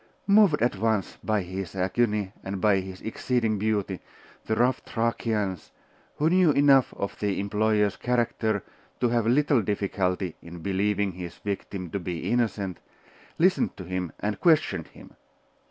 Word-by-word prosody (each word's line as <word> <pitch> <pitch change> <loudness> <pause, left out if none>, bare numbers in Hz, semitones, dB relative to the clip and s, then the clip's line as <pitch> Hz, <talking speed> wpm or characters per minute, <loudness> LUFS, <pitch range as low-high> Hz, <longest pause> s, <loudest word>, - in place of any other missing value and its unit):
Moved 200 - +5
at 120 -5 +1
once 110 -2 0
by 105 -3 +1
his 95 0 -6
agony 105 +1 0
and 95 0 -4
by 100 0 +3
his 95 -1 -8
exceeding 110 -1 -1
beauty, 100 -3 -1 0.5
the 110 - 0
rough 125 +3 +2
Thracians, 110 -5 -2 0.4
who 150 - +1
knew 180 -2 +5
enough 140 -2 +5
of 100 - -4
their 100 -2 0
employer's 105 0 +1
character 115 -4 0 0.4
to 120 - +2
have 115 -1 +1
little 140 0 +3
difficulty 95 -3 -1
in 85 -1 -10
believing 100 +1 0
his 85 -1 -7
victim 95 -3 -5
to 100 - -2
be 90 -2 -4
innocent, 105 -6 0 0.6
listened 185 +3 +2
to 95 - -7
him 90 -2 -3
and 105 0 -2
questioned 160 -3 +2
him. - - -15
105 Hz, 145 wpm, -26 LUFS, 95-120 Hz, 0.6 s, Moved